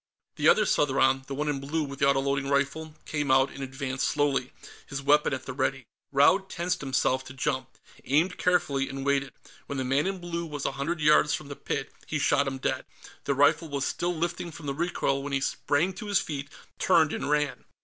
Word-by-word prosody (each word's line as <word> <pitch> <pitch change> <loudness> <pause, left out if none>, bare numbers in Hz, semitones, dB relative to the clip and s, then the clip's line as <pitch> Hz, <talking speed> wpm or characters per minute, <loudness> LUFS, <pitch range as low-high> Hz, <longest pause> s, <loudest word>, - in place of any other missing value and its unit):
The - - +4
other - - +5
Southron, 135 -2 +2
the 140 - -4
one 150 +2 -2
in 145 -2 -1
blue 150 +4 -2
with 140 -1 -7
the 140 - +3
autoloading 140 0 +1
rifle, 140 +3 -1
came 150 -2 -2
out 130 +1 +4
and 140 - -9
advanced 130 0 -2
slowly, 140 -3 0 0.4
his 135 - -4
weapon 145 +2 +3
at 130 -1 -3
the 130 - -5
ready. 135 -1 -1 0.3
Raud 145 +8 +4
tensed 180 +1 -2
himself 130 -1 +1
to 130 - -9
jump, 130 0 -2 0.3
aimed 155 +7 +1
carefully, 175 -7 +1
and 135 0 -5
waited. 140 -1 +1 0.4
When 140 - -4
the 130 - -1
man 135 +6 +1
in 195 0 -2
blue 170 -1 -4
was 145 -3 -5
a - - +1
hundred 145 +4 -3
yards 150 0 +5
from 150 -2 -8
the 140 - -6
pit, 135 0 -4
he 155 - -1
shot 140 -1 +2
him 135 0 -3
dead. 130 - -2 0.4
The 140 - +1
rifle 145 +4 +3
was 140 -1 -2
still 175 0 -1
lifting 170 +1 -2
from 160 -1 -10
the 140 - -2
recoil 140 -3 -1
when 140 0 -5
he 135 - +2
sprang 145 +6 0
to 210 +3 -8
his 200 -2 +3
feet, 145 -4 -5 0.3
turned, 160 -4 +4
and 140 - -3
ran. 150 -1 0
140 Hz, 210 wpm, -27 LUFS, 135-155 Hz, 0.4 s, other